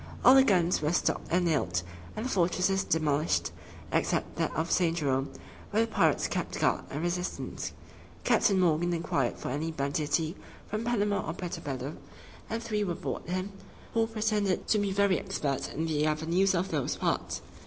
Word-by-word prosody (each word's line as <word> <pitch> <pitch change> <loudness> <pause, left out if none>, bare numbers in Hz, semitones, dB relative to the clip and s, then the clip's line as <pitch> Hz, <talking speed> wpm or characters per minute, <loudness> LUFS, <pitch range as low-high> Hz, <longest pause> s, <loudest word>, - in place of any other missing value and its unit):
All 255 - +10
the 270 0 +8
guns 180 - +3
were 150 +2 +1
stopped - - 0
and 175 +2 +2
nailed, 90 - +1 0.3
and 220 - -3
the - - -1
fortresses 185 +1 +2
demolished, 155 -1 +1 0.4
except - - 0
that - - 0
of 160 +2 -1
St. 170 -2 +2
Jerome, 135 -3 0 0.4
where 220 +2 +2
the 230 - -12
pirates - - +3
kept - - -3
guard - - +1
and 145 +4 -4
resistance. 180 +1 -3 0.5
Captain 195 -2 +3
Morgan 175 0 +2
inquired 140 -6 0
for - - -5
any 155 +4 -2
banditti 155 +3 -1 0.3
from 215 +2 -3
Panama 205 -4 +1
or - - -1
Puerto 175 0 -5
Bello, 135 +1 -4 0.5
and 225 +1 -3
three 215 -2 -1
were 180 -4 -1
brought - - -5
him, 185 +2 -2 0.4
who 225 -1 +2
pretended 215 -3 0
to 215 - +4
be 200 -1 0
very 200 -1 +3
expert 150 -8 -2
in 160 - -2
the 155 -1 +1
avenues 170 +5 +2
of 180 +2 -1
those 145 -5 0
parts. - - -1
175 Hz, 175 wpm, -29 LUFS, 155-200 Hz, 0.5 s, All